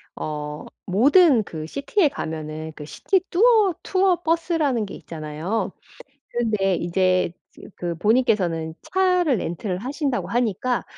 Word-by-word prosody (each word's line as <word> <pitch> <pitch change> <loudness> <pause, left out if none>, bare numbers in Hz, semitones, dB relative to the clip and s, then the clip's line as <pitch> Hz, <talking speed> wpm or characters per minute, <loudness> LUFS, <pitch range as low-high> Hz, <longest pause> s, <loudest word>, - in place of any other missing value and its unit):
어 150 -1 -5 0.2
모든 265 - +5
그 155 -5 -7
City에 290 - 0
에 - - +6
가면은 155 - -5
그 150 - -7
City 380 - 0
뚜어 420 -1 +4
투어 370 -2 +2
버스라는 320 -8 +1
게 - - -9
있잖아요? 160 +6 -4 0.6
근데 215 -5 0
이제 185 +1 +1 0.3
이제 - - -12
그 175 -1 -3
본인께서는 190 -8 +1
차를 365 -7 +2
렌트를 180 +1 -3
하신다고 270 - -2
하니까 240 +1 0
220 Hz, 300 characters per minute, -23 LUFS, -, 0.6 s, 에